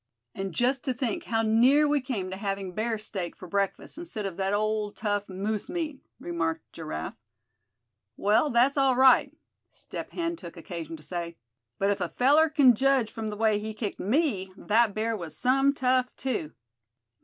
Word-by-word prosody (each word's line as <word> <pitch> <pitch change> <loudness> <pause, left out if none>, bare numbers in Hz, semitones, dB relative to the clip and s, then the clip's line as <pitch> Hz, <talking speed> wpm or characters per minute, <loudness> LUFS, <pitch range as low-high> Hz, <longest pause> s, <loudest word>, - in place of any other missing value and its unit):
"And 195 0 -4
just 245 +7 +1
to 260 - 0
think 240 -3 -2
how 225 0 0
near 250 +7 +5
we 290 -1 +2
came 215 -8 -3
to - - -3
having 195 -2 -3
bear 220 +3 -1
steak 195 -5 -5
for 185 - -11
breakfast, 200 - -2
instead 335 -12 -4
of 190 -3 -4
that 195 0 0
old 210 0 0
tough 205 -2 -2
moose 200 +3 -3
meat," 315 -5 -3 0.2
remarked 165 -2 -3
Giraffe. 80 - -5 1.0
"Well, 215 +9 +3
that's 250 +4 +3
all 270 -2 +4
right," 260 0 +6 0.4
Step - - -7
Hen 335 -1 -3
took 170 - -10
occasion 165 -1 -6
to 155 - -17
say; 170 -1 -5 0.4
"but 200 +1 +2
if 200 -1 -2
a 175 - -1
feller 295 - +4
c'n 285 -5 +6
judge 265 -1 +2
from 220 -1 -4
the 210 - -6
way 215 -1 +2
he 215 +1 -5
kicked 215 -2 -4
me, 210 - 0
that 220 -1 +2
bear 225 +1 0
was 170 -6 -6
some 270 +2 +3
tough 255 -2 +1
too. 215 - -3
215 Hz, 180 wpm, -27 LUFS, 195-260 Hz, 1.0 s, right